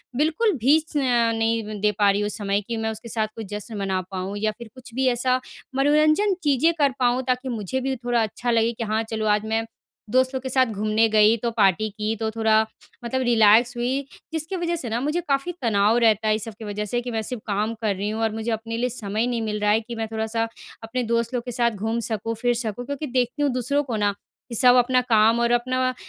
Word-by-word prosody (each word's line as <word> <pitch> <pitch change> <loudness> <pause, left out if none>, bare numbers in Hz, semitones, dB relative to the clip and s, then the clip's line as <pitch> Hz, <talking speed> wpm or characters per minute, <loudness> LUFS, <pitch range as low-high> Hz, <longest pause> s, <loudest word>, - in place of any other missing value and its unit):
बिल्कुल 320 - +2
भी 290 +5 +6
स 305 - -4
नहीं 230 -4 +1
दे 210 0 +3
पा 205 -1 +5
रही 200 +1 0
हूँ 205 - -1
समय, 200 -1 -1
कि 230 +3 -5
मैं 220 0 -1
उसके 220 +2 -8
साथ 220 -1 0
कोई 225 - -6
जश्न 210 +1 -6
मना 190 -2 -1
पाऊँ 190 +2 -4
या 215 +1 0
फिर 235 -2 -9
कुछ 250 -2 -13
भी 265 0 +1
ऐसा 255 +1 +2 0.4
मनोरंजन 305 +8 +3
चीज़ें 295 +3 +3
कर 285 -2 +4
पाऊँ, 250 0 +2
ताकि 255 +1 -1
मुझे 230 +1 -3
भी 265 +1 -1
थोड़ा 240 -1 0
अच्छा 225 +3 -2
लगे 230 0 +2
कि, 230 - -5
"हाँ, 220 +1 0
चलो, 220 -1 -2
आज 210 0 +2
मैं 225 +1 -1 0.4
दोस्तों 260 +3 +2
के 260 0 -5
साथ 260 0 +3
घूमने 215 +2 +2
गई, 215 +1 +5
तो 235 +1 -2
पार्टी 205 +1 +3
की, 215 +2 -3
तो 220 0 -2
थोड़ा 220 0 +3 0.4
मतलब 260 +2 -1
रिलैक्स 235 +1 +5
हुई।" 250 +3 0 0.3
जिसकी 320 +4 -2
वजह 345 -1 -1
से 265 -8 -3
ना, 225 +2 -1
मुझे 300 +6 -1
काफ़ी 275 +5 0
तनाव 215 -1 +3
रहता 220 -1 +3
है 215 - +3
इस 215 - -3
सब 225 - -6
की 220 - -7
वजह 210 0 -3
से, 240 +4 -1
कि, 245 0 -5
"मैं 225 -1 -1
सिर्फ़ 225 +1 -5
काम 210 +2 -1
कर 210 -3 0
रही 200 +2 -3
हूँ 220 +1 -3
और 220 - +1
मुझे 225 +1 -3
अपने 225 +1 -3
लिए 250 +2 0
समय 220 -1 -2
नहीं 240 -2 -1
मिल 210 -1 -2
रहा 210 0 +3
है 220 +2 +3
कि 235 +1 -8
मैं 225 -1 -3
थोड़ा-सा 220 +1 -1 0.4
अपने 245 +3 -2
दोस्त 235 +1 0
लोग 245 -1 -1
के 245 - -4
साथ 235 0 +1
घूम 220 +2 -2
सकूँ, 225 +1 -2
फिर 240 +2 +1
सकूँ।" 235 0 -4
क्योंकि 285 +3 -4
देखती 250 +2 -1
हूँ 285 - +2
दूसरों 255 +4 0
को 250 -5 -4
ना, 205 -1 +1 0.4
कि, 235 - -4
सब 250 +2 +6
अपना 250 +1 +4
काम 220 +2 +5
और 235 0 +2
अपना 255 +1 +1
230 Hz, 240 wpm, -23 LUFS, 215-255 Hz, 0.4 s, भी